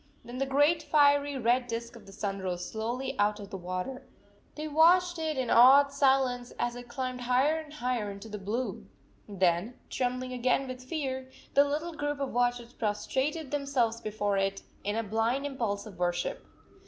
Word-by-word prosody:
Then 245 +1 -7
the 270 - 0
great 290 +4 +3
fiery 285 -2 +3
red 245 +1 +2
disk 235 0 -5
of 235 - -14
the - - -11
sun 195 0 -3
rose 180 -1 -3
slowly 235 +6 -3
out 210 +1 +2
of 200 -1 -9
the - - -5
water! 185 +8 -4 0.5
They 305 0 -4
watched 345 +3 +4
it 315 -2 -2
in 255 -3 -1
awed 275 +4 +7
silence 265 -3 +2
as 240 0 -1
it 245 0 -9
climbed 255 0 -4
higher 260 +6 +2
and 310 -2 -10
higher 250 -7 -2
into 200 +2 -8
the 210 -1 -6
blue. 225 +6 -3 0.4
Then, 185 +3 +1 0.2
trembling 255 0 -2
again 255 +2 +1
with 255 0 -7
fear, 260 -2 -4 0.2
the 280 - +6
little 310 +4 -2
group 290 -1 -3
of 275 -1 -1
watchers 245 0 0
prostrated 260 +8 -2
themselves 270 -6 0
before 205 -2 -1
it 195 0 -1 0.2
in 205 +1 -1
a 225 - 0
blind 225 +6 0
impulse 230 -8 -2
of 195 -5 -11
worship. 175 -1 -1
250 Hz, 180 wpm, -29 LUFS, 215-280 Hz, 0.5 s, awed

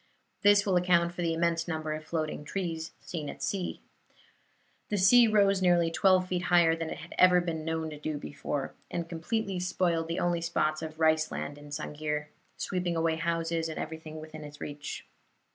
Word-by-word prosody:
This 205 0 +6
will 190 -3 +3
account 175 -1 +3
for 175 - -5
the 165 -1 +1
immense 170 0 +1
number 155 -2 -2
of 155 0 -5
floating 155 -2 -3
trees 165 -1 -3
seen 155 -4 -5
at - - -7
sea. 190 -3 -2 1.1
The 210 - 0
sea 230 +6 +7
rose 200 -3 +4
nearly 175 -2 +4
twelve 185 +1 +4
feet 180 0 -2
higher 170 -2 +5
than 165 -1 -4
it - - -5
had 165 - -10
ever 180 -1 +7
been 165 -3 -3
known 160 0 -2
to 150 - -8
do 150 0 -3
before, 145 -1 -4 0.2
and 170 -1 -3
completely 190 +3 -2
spoiled 175 -2 0
the 165 - -3
only 175 -1 +1
spots 155 -2 0
of 160 0 -7
rice 160 0 +3
land 145 0 -5
in 145 0 -12
Sang'ir 150 0 -3 0.3
sweeping 180 -2 -1
away 165 0 +1
houses 165 0 -1
and 160 - -6
everything 160 -1 -6
within 155 0 -9
its 145 0 -10
reach. 145 0 -6
165 Hz, 185 wpm, -29 LUFS, 155-180 Hz, 1.1 s, sea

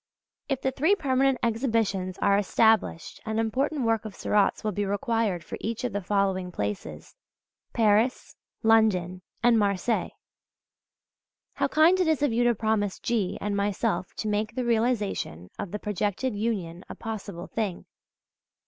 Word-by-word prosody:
If 270 -2 -1
the 265 - +1
three 315 +10 +3
permanent 270 -5 +2
exhibitions 225 -6 0
are 200 - +4
established 220 -3 +1
an 220 0 -3
important 260 +5 0
work 225 -1 +1
of 215 -3 -8
Seurat's 205 -1 +1
will 215 - 0
be 205 +1 -2
required 205 -3 0
for - - -7
each 230 +3 -3
of 250 - -2
the 205 - -1
following 190 -1 0
places 100 - -5 0.6
Paris, 225 +3 +2 0.3
London 200 -5 +3 0.2
and 240 -2 +5
Marseilles. 200 +2 0 1.4
How - - 0
kind 325 +4 +4
it 365 - +2
is 315 -2 +2
of 290 - +2
you 240 +1 +2
to 240 -1 +3
promise 215 -2 0
G. 210 -6 -1
and 205 0 -2
myself 200 -2 -1
to 215 - -4
make 210 +1 -1
the 255 -1 -1
realization 220 - -1
of 200 - -4
the 210 - -4
projected 210 +4 -2
union 195 -5 -3
a - - -7
possible 200 -5 -6
thing! 205 -5 -3
215 Hz, 150 wpm, -27 LUFS, 195-235 Hz, 1.4 s, and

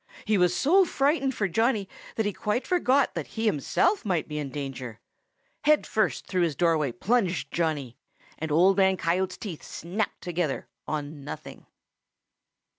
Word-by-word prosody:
He 215 - +2
was 180 -2 +3
so 370 +8 +5
frightened 275 -4 +1
for 205 - 0
Johnny 220 +2 +1 0.3
that 220 - 0
he 205 - 0
quite 210 +7 -1
forgot 280 -7 +2
that - - -4
he 225 - 0
himself 220 - +2
might 180 -7 0
be 150 0 -4
in 145 -2 -4
danger. 130 -5 -6 0.7
Head 300 0 +4
first 215 -3 0
through 185 -1 0
his 165 -4 +1
doorway 160 -5 +2
plunged 190 - 0
Johnny, 150 -7 -1 0.4
and 160 -1 -3
Old 180 +5 +5
Man 190 -1 +4
Coyote's 185 +2 0
teeth 180 -8 -6
snapped 195 +6 -4
together 170 -5 -2 0.2
on 150 -1 -4
nothing. 145 - -9
185 Hz, 155 wpm, -27 LUFS, 155-220 Hz, 0.7 s, so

